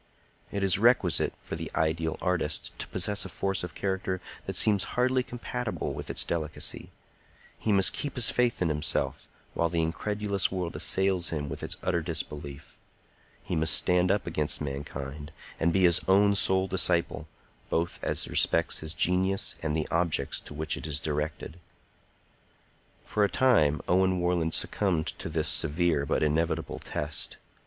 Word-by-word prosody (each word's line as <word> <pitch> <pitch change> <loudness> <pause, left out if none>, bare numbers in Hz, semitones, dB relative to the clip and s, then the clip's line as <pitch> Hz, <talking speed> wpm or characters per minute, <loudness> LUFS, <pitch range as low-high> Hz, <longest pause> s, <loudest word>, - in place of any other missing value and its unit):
It 100 -1 -2
is 95 -1 +3
requisite 115 -7 +3
for - - -5
the - - -5
ideal 80 0 0
artist - - -1
to - - -3
possess 105 -1 0
a 95 - -7
force 95 +2 -2
of 90 - -7
character 95 -1 -2 0.3
that - - -3
seems 100 -3 +4
hardly 130 +1 +3
compatible 120 - -4
with - - -6
its - - +1
delicacy; 80 -2 -3 0.7
he 110 - 0
must 100 0 +5
keep 145 - -3
his 125 -3 +5
faith 120 -6 +1
in 85 - +1
himself 75 -1 -1 0.3
while 85 - +1
the 85 0 0
incredulous 100 +4 -1
world 90 -3 -3
assails 95 -2 +1
him 75 -3 -3
with - - -6
its - - -3
utter - - 0
disbelief; 70 -1 -6 0.6
he - - -3
must 80 0 +4
stand 90 0 +3
up 100 0 +1
against 75 -3 0
mankind 70 +1 -6 0.3
and 85 +1 +2
be 95 +1 +2
his 85 -1 +6
own 100 +2 +5
sole 95 -1 +3
disciple, 85 -4 +1 0.4
both 85 +1 -1
as - - 0
respects - - +1
his 80 0 -3
genius 95 +2 +1
and 80 -2 -1
the 80 - -1
objects 85 -5 +1
to 75 - -10
which 80 0 0
it - - -3
is 75 -1 +1
directed. 75 +3 -3 1.5
For 105 - 0
a 100 - +3
time 80 - +3
Owen 95 0 +3
Warland 85 -2 +1
succumbed 90 -6 0
to - - -4
this 80 -1 -1
severe 80 -2 +1
but - - +1
inevitable 80 +2 -1
test. 75 +1 -4
85 Hz, 160 wpm, -28 LUFS, 80-95 Hz, 1.5 s, his